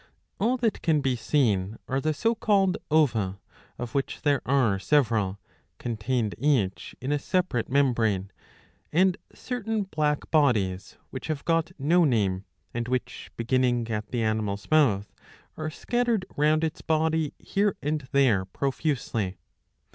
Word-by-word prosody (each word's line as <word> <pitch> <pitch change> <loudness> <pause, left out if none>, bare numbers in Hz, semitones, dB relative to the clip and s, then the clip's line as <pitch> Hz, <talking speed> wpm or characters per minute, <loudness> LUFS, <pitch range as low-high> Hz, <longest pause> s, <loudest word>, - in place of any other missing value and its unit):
All 240 +5 +2
that 235 -3 0
can 155 -4 +2
be 130 -2 +1
seen 110 -6 +1
are 135 +1 -1
the 155 - +1
so 225 +10 +1
called 195 -4 +2
ova,^^ 115 -11 +2 0.4
of 120 -2 -6
which 140 -1 -2
there 145 -3 +2
are 125 -8 +3
several, 105 -5 +2 0.4
contained 115 -1 -1
each 125 -10 0
in 130 +3 -3
a 145 - +1
separate 180 - 0
membrane, 115 -8 +1 0.6
and 180 +3 +4 0.2
certain 225 -4 -3
black 150 -5 -1
bodies 105 - +1
which 130 - -6
have 155 -3 -3
got 165 0 +1
no 165 +5 +3
name, 100 - +1 0.3
and 120 0 -3
which, 125 0 -3
beginning 120 -1 +1
at 105 -1 -3
the 120 -2 -1
animal's 110 -1 -2
mouth, 115 -11 +3 0.4
are 155 0 -3
scattered 235 +2 0
round 155 +2 +3
its 160 0 -2
body 160 -1 0
here 200 0 0
and 150 -2 -2
there 120 -9 +3
profusely. 125 - -2
135 Hz, 140 wpm, -26 LUFS, 110-155 Hz, 0.6 s, and